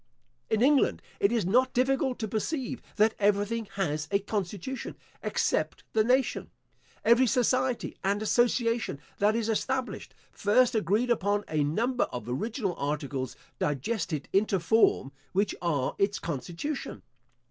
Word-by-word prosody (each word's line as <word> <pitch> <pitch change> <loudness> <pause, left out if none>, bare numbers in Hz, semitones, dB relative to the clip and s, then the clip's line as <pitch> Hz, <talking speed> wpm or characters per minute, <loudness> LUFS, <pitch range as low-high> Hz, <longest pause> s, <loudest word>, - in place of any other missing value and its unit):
In 220 +1 +2
England 280 0 +3 0.2
it 200 - +3
is 230 -6 +1
not 255 +7 +2
difficult 265 +1 +1
to 220 - -3
perceive 255 +5 -3
that 220 +1 +4
everything 205 +2 +1
has 155 -6 -1
a 200 - +3
constitution, 205 +4 -4 0.2
except - - -1
the 220 - +4
nation. 255 +3 +1 0.6
Every 235 +3 +5
society 255 +1 +1
and 200 +1 +1
association 230 - +1 0.2
that 210 +2 +3
is 230 -1 0
established, 255 +3 -2 0.2
first 240 +5 +3
agreed 220 +4 +1
upon 205 -2 +1
a 155 -2 +1
number 235 - +1
of 125 - -7
original 200 - -2
articles, 140 -3 -3 0.2
digested 150 - -2
into 195 -1 +2
form, 170 -6 +3 0.2
which 200 +2 +1
are 150 -7 0
its 200 0 +2
constitution. 170 - -5
215 Hz, 130 wpm, -28 LUFS, 180-245 Hz, 0.6 s, Every